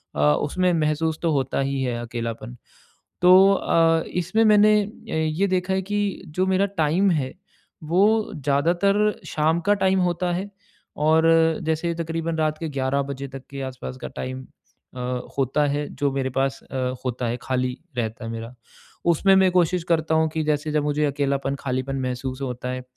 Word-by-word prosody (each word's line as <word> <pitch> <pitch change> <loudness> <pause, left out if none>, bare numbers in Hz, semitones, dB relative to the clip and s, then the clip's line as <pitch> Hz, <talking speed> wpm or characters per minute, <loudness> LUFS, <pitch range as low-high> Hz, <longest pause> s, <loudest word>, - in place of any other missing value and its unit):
अ, - - -4
उसमें 180 - 0
महसूस 155 0 0
तो 165 -2 +1
होता 135 -2 0
ही 135 0 -1
है 120 -2 -2
अकेलापन। 115 0 -5 0.7
तो 185 +2 +7
अ, 165 -3 +2 0.2
इसमें 205 +6 +1
मैंने 215 0 +6 0.3
ए, 160 0 0
ये 190 +6 +1
देखा 185 0 0
है 190 - 0
कि 205 0 -2
जो 180 +5 -1
मेरा 190 +1 +2 0.2
टाइम 175 +6 +2
है 140 -6 -1 0.5
वो 205 +7 +2
ज़्यादातर 170 +9 +2 0.2
शाम 160 +2 +1
का 205 - +6
टाइम 190 -1 +2
होता 175 0 0
है 195 +3 -4 0.6
और 160 +1 +4 0.4
जैसे 160 +2 -1
तकरीबन 165 0 -3
रात 155 -1 0
के 165 - -4
11 135 0 0
तक 135 -1 -7
के 140 0 -7
आस-पास 130 -1 -6
का - - -4
टाइम 130 0 -6 0.5
अ, - - -5 0.4
होता 135 +3 +2
है 145 +1 -2
जो 140 -1 0
मेरे 135 -1 -1
पास 135 +1 -1
अ, - - -4 0.3
होता 125 -1 -2
है 120 - -1
खाली 125 0 -2 0.2
रहता 115 -2 -3
है 115 - -4
मेरा, 115 +2 -7 0.5
उसमें 185 +3 +4
मैं 190 -1 +5
कोशिश 180 -1 +2
करता 160 -2 +1
हूँ 160 0 +3
कि 160 0 -2
जैसे 150 0 -1
जब 150 -1 +1
मुझे 150 +1 0
अकेलापन, 140 -1 -1
खालीपन 130 +1 -2
महसूस 130 +1 -4
होता 125 -1 -4
है 130 0 -4
155 Hz, 170 wpm, -23 LUFS, 135-180 Hz, 0.7 s, तो